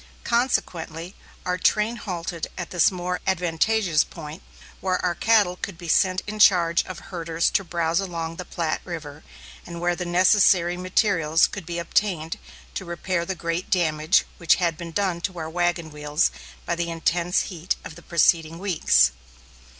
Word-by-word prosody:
Consequently, 180 -8 -1 0.3
our 180 0 -1
train 215 +5 +2
halted 170 -5 -4
at 175 - -5
this 175 -3 +4
more 180 -1 -3
advantageous 180 0 +2
point, 155 -1 -9 0.4
where 185 -1 0
our 175 - +1
cattle 205 -1 +3
could 180 -1 -6
be 170 -1 -9
sent 185 +3 +2
in 215 +1 -6
charge 170 -4 +5
of 185 - -7
herders 165 -2 -2
to 195 - +1
browse 170 -1 0
along 165 -4 -4
the 180 - -5
Platte 165 -3 -2
River, 155 -4 -7 0.4
and 170 -1 -8
where 175 0 +1
the 180 - -4
necessary 180 0 +4
materials 180 -3 +2
could - - -6
be 170 0 -4
obtained 170 -2 -1 0.3
to - - -4
repair 170 0 -2
the 190 - -2
great 170 +1 -3
damage 160 0 +2
which 170 - +4
had 170 -3 0
been 170 0 -8
done 185 -2 -1
to 185 0 -3
our 160 -1 -5
wagon 175 -2 -1
wheels 150 +1 0 0.3
by - - -1
the 170 0 -2
intense 170 +1 +1
heat 170 +2 -2
of - - -7
the 175 - -13
preceding 165 -1 +2
weeks. 160 - +3
175 Hz, 165 wpm, -24 LUFS, 165-185 Hz, 0.4 s, charge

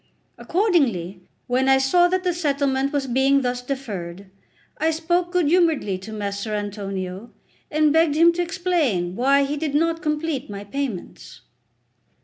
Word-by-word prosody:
Accordingly, 260 - 0 0.2
when 260 +2 +1
I 265 - +6
saw 310 +7 +4
that 370 +1 -1
the 360 -1 +1
settlement 280 -4 0
was 285 -2 -1
being 265 +2 +2
thus 245 0 -2
deferred, 200 -9 -6 0.5
I 320 +2 +2
spoke 345 +2 0
good 360 -2 +2
humouredly 310 - +2
to 205 +4 -10
Messer 205 0 -4
Antonio, 200 0 -5 0.4
and 305 -1 +2
begged 320 -2 +3
him 335 +2 +5
to 350 - -1
explain 335 - -1
why 275 +4 +3
he 285 +2 -2
did 295 -1 -2
not 330 +2 +1
complete 300 -5 -2
my 200 0 -6
payments. 205 - -6
275 Hz, 145 wpm, -22 LUFS, 205-325 Hz, 0.5 s, I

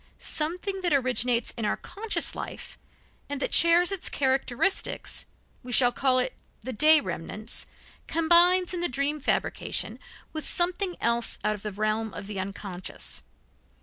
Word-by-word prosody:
Something 365 +5 -1
that 350 -4 +1
originates 250 -3 +2
in 230 - -6
our 210 - 0
conscious 430 +2 -2
life, - - -8 0.5
and 285 -1 -3
that - - -2
shares 340 +2 +6
its 390 -3 0
characteristics 270 +6 0 0.3
we 250 - -9
call 255 +1 +4
it 255 - 0 0.3
the 260 - -6
day 310 +7 +6
remnants 200 - -5 0.4
combines 345 +2 +4
in 350 - -3
the 350 - +2
dream 280 +4 -1
fabrication 280 - -1 0.3
with 310 -1 -4
something 355 +1 0
else 235 0 +2
out 210 +1 +1
of 210 - -8
the 210 - -5
realm 215 +1 -2
of - - -7
the 200 -1 -6
unconscious. 190 -1 -6
270 Hz, 145 wpm, -26 LUFS, 225-345 Hz, 0.5 s, shares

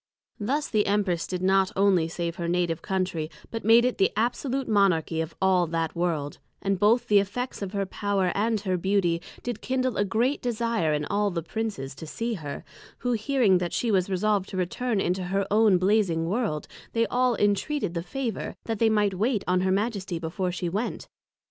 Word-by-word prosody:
Thus 280 +8 -1
the 210 -2 +1
Empress 195 -4 +1
did 180 -1 -3
not 190 0 +3
onely 190 -4 +3
save 170 0 -4
her 170 - -3
Native 170 -2 0
Country, 180 -5 -2 0.2
but 225 - -4
made 230 +2 +6
it 250 - -1
the 195 - +4
Absolute 250 +4 -1
Monarchy 180 -6 +2
of 160 0 -5
all 185 -2 +3
that 165 0 -2
World; 165 -4 -2 0.2
and 195 -1 -1
both 220 +5 +3
the 205 -1 +6
effects 230 +6 -3
of 200 0 -4
her 200 -1 0
Power 195 -1 0
and 220 +2 +1
her 185 -3 0
Beauty, 175 -2 +1 0.2
did 245 -3 -4
kindle 255 -2 -1
a - - +3
great 235 +8 0
desire 230 -8 0
in 150 0 0
all 205 +3 +1
the 170 -3 -3
greatest 160 - -25
Princes 210 -12 -3
to 160 - -9
see 230 +8 -3
her; 150 -8 -6 0.3
who 245 - -2
hearing 225 -4 +3
that 175 -1 -3
she 235 - 0
was 190 -2 +2
resolved 195 +1 +1
to 190 - -5
return 210 +5 -1
into 185 0 0
her 195 +2 0
own 210 -2 +5
Blazing 185 -4 +2
World, 190 -5 -1 0.3
they 230 0 +2
all 250 0 +1
entreated 205 - 0
the 170 - -2
favour, 240 +3 -4
that 225 -2 -3
they 225 - +4
might 210 -2 +2
wait 215 +3 0
on 180 0 +2
her 190 0 +1
Majesty 200 -3 -1
before 175 +3 -2
she 175 0 -3
went. 205 +8 -3
195 Hz, 200 wpm, -26 LUFS, 175-225 Hz, 0.3 s, made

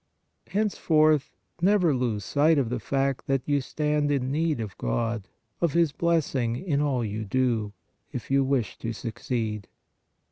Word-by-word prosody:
Henceforth 155 -8 +2 0.3
never 180 -4 +4
lose 115 -6 -1
sight 155 +2 +3
of 130 -5 +1
the 125 - -1
fact 135 +3 -1
that 135 -2 0
you 145 -1 +2
stand 150 +1 0
in 135 -2 0
need 155 -1 0
of 105 -4 -5
God, 105 - -1 0.3
of 170 -4 +2
His 170 -3 +3
blessing 140 -8 0
in 145 0 -1
all 130 -5 0
you 110 +1 -3
do, 115 -1 0 0.4
if 125 - -6
you 135 0 +4
wish 130 -4 -1
to 115 0 -3
succeed." 110 -2 -3
135 Hz, 150 wpm, -26 LUFS, 115-150 Hz, 0.4 s, never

